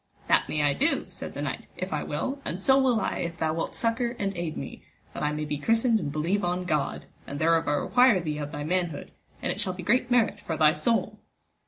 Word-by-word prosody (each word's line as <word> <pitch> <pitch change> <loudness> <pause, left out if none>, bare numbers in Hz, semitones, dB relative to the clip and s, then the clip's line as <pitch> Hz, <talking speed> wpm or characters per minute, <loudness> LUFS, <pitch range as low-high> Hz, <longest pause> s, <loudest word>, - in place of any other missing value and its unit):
That - - +3
may 150 -1 0
I 145 -1 +3
do, 300 - +1
said - - -8
the - - -3
knight, - - -4
if - - -4
I - - -1
will, 275 +1 -3
and 175 - -4
so 265 +7 +4
will 250 -4 +3
I - - -1
if 170 0 -3
thou 160 -1 0
wilt 165 - -3
succour 235 +1 0
and 200 -1 -2
aid 170 -2 -3
me, - - -7 0.3
that - - -6
I 150 - +1
may 150 0 -3
be 150 -1 -3
christened 225 - +3
and 150 -6 -3
believe 170 +7 0
on 180 +1 -1
God, 150 -5 -1 0.2
and 140 - -5
thereof 165 +1 +2
I 145 - +2
require 245 - +4
thee 155 -3 -3
of 145 0 -4
thy 145 -2 -4
manhood, 175 -1 -2 0.3
and - - 0
it - - -5
shall 185 - -1
be 180 0 -8
great 240 +6 +2
merit 245 -2 +2
for 160 - -4
thy 155 0 +5
soul. 225 +10 0
175 Hz, 240 wpm, -27 LUFS, 155-230 Hz, 0.3 s, thy